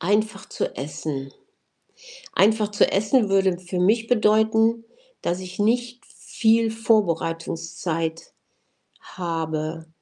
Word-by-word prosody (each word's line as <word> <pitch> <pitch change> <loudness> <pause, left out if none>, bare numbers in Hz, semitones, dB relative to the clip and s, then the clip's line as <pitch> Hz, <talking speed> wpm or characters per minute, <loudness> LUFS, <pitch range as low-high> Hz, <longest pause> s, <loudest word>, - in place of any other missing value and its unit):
„Einfach 205 +2 0
zu - - -3
essen“. 135 0 -5 1.0
„Einfach 215 +1 +3
zu 205 - +3
essen“ 210 +2 +2
würde 190 -2 +2
für 180 0 -4
mich 225 +5 +2
bedeuten, 220 0 +3 0.4
dass 175 +2 -1
ich 185 +1 -9
nicht 240 +3 0
viel 225 0 +1
Vorbereitungszeit 165 -5 -1 0.7
habe. 160 -2 -4
195 Hz, 95 wpm, -23 LUFS, 165-220 Hz, 1.0 s, Einfach